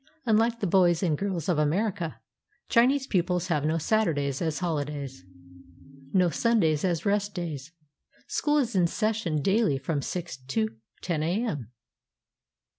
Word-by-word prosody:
Unlike 230 +1 +2
the - - +1
boys 175 -1 +3
and 165 -4 +2
girls 185 -2 -3
of 175 -5 +2
America, 175 +2 0 0.5
Chinese 265 +3 +4
pupils 180 -4 0
have 150 -4 +1
no 160 +2 +1
Saturdays 155 -8 0
as 160 -3 -1
holidays, 145 - -3 0.9
no 180 -1 +3
Sundays 170 -11 +2
as 175 -2 0
rest 205 0 0
days. 160 -5 -5 0.5
School 295 0 +1
is 240 -6 0
in 180 -2 +4
session 210 -7 -1
daily 200 -7 +2
from 140 +2 -2
6 175 +1 -4
to 130 -4 -1 0.4
lo 170 -3 +1
a.m. 160 - -1
175 Hz, 135 wpm, -27 LUFS, 150-210 Hz, 0.9 s, Chinese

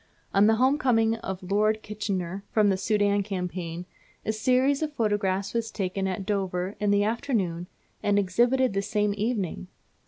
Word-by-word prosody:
On 200 +1 +5
the 220 - +5
home 260 +5 +3
coming 225 -4 +2
of 190 -4 -6
Lord 215 +3 +1
Kitchener 200 -3 -3
from 210 -2 +4
the 195 - +3
Soudan 205 +1 +1
Campaign, 180 -3 -4 0.4
a 220 - 0
series 255 +5 +2
of 305 -1 -2
photographs 200 -4 0
was 230 -1 -1
taken 195 -2 -2
at 190 +1 -3
Dover 190 -1 -2
in 210 0 +1
the 205 0 +3
afternoon 205 -7 -1 0.3
and 205 0 +2
exhibited 240 +6 +2
the 195 - 0
same 210 0 0
evening! 210 -5 -2
205 Hz, 160 wpm, -26 LUFS, 190-225 Hz, 0.4 s, On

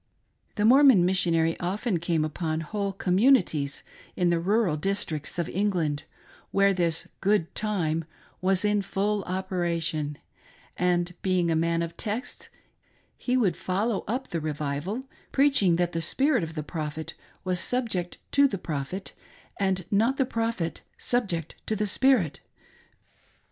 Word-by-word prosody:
The 210 - +1
Mormon 255 -6 +7
Missionary 170 -3 +2
often 190 +2 -1
came 165 -2 0
upon 155 +1 -2
whole 200 +5 -2
communi 195 +5 +4
ties 140 -2 -4 0.3
in 180 -2 +2
the 170 - +2
rural 195 -1 +2
districts 160 -3 -2
of 170 - -1
England, 170 -7 -1 0.4
where 195 0 +3
this 170 -3 0
" - - -45
good 195 -4 +1
time 165 -7 -1 0.2
" - - -31
was 190 +1 +2
in 210 0 +2
full 205 +1 -1
operation; 170 -5 -2 0.6
and 180 0 +1
being 180 -3 +1
a - - +2
man 165 +1 +1
of 170 0 -6
texts 220 +4 -4 0.7
he 250 0 0
would 195 -9 +2
follow 200 +3 -1
up 250 +6 -2
the 165 - -2
revival, 150 - -3 0.3
preaching 270 -11 +4
that 175 0 +1
the 165 - -2
spirit 270 - +2
of 160 -1 -5
the 155 - -3
prophet 155 0 -5 0.3
was 185 -1 +1
subject 220 -9 -1
to 280 0 +5
the 200 - -3
prophet, 165 +3 -5 0.5
and 190 -3 0
not 225 +7 +2
the 270 - +2
prophet 225 -8 -2 0.2
subject 185 -10 -1
to 220 - 0
the 210 0 0
spirit. 215 - +3
185 Hz, 145 wpm, -27 LUFS, 165-210 Hz, 0.7 s, Mormon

